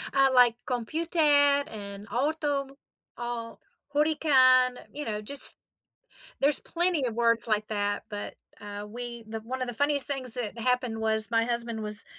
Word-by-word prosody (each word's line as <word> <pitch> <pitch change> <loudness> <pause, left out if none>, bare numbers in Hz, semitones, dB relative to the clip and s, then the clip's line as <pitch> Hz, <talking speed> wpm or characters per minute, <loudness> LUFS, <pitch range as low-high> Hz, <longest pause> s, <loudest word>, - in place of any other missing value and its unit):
Uh, 270 0 +5
like,, 245 -2 +6
"computer" 315 +8 -2 0.5
and 200 -1 -8
"auto," 280 +1 -1 0.4
all 240 -1 -5 0.3
"hurricane," 260 -5 +4 0.2
you 295 +1 -5
know, 210 -1 -3
just 280 +6 0 0.8
There's 285 +1 +3
plenty 345 -5 0
of 230 - -3
words 230 0 +2
like 215 0 +1
that, 205 -1 -1
but, 205 -1 -6 0.2
uh, 205 0 -7
we 235 +1 -7
the 220 0 -5
One 255 +4 -5
of 255 - -1
the 245 - -5
funniest 285 +2 +1
things 270 -3 -2
that 235 -2 -4
happened 250 -1 0
was 220 0 +3
my 230 0 +2
husband 235 -2 -2
was 210 +1 -5
240 Hz, 155 wpm, -28 LUFS, 220-275 Hz, 0.8 s, like